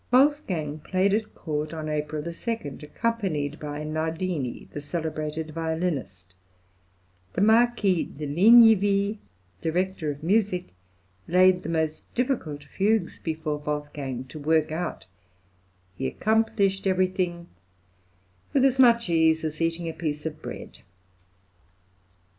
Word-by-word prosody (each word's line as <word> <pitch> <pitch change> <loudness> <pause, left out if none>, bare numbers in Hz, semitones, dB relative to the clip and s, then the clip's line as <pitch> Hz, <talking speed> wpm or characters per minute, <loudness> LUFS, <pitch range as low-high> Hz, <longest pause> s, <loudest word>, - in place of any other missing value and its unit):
Wolfgang 245 - +2
played 190 +5 +1
at 215 0 -1
court 150 0 -3
on 155 -1 -5
April 150 0 -2
2, 170 +8 -3 0.2
accompanied 155 -4 -2
by 150 0 -5
Nardini, 160 -2 -3
the 145 - -5
celebrated 155 0 -4
violinist; 155 - -3 1.0
the 180 - -1
Marquis 220 -4 +4
de 150 +1 -7
Ligniville, 205 +3 +5 0.4
director 175 0 -1
of 145 +1 -6
music, 190 -1 +1 0.6
laid 185 +1 +5
the 165 - -6
most 160 -1 -2
difficult 235 - -1
fugues 200 +4 0
before 155 -2 -3
Wolfgang 145 -3 -4
to 130 +4 -10
work 155 +1 +2
out; 165 +2 -4 0.9
he 135 - -2
accomplished 200 -1 +1
everything 185 -2 0 1.1
"with 270 -1 +4
as 265 -1 +2
much 235 -3 +6
ease 160 -1 +3
as 155 0 -4
eating 165 +1 -1
a 165 - -3
piece 150 -2 -4
of 155 -1 -5
bread." - - -8
165 Hz, 115 wpm, -26 LUFS, 150-195 Hz, 1.1 s, much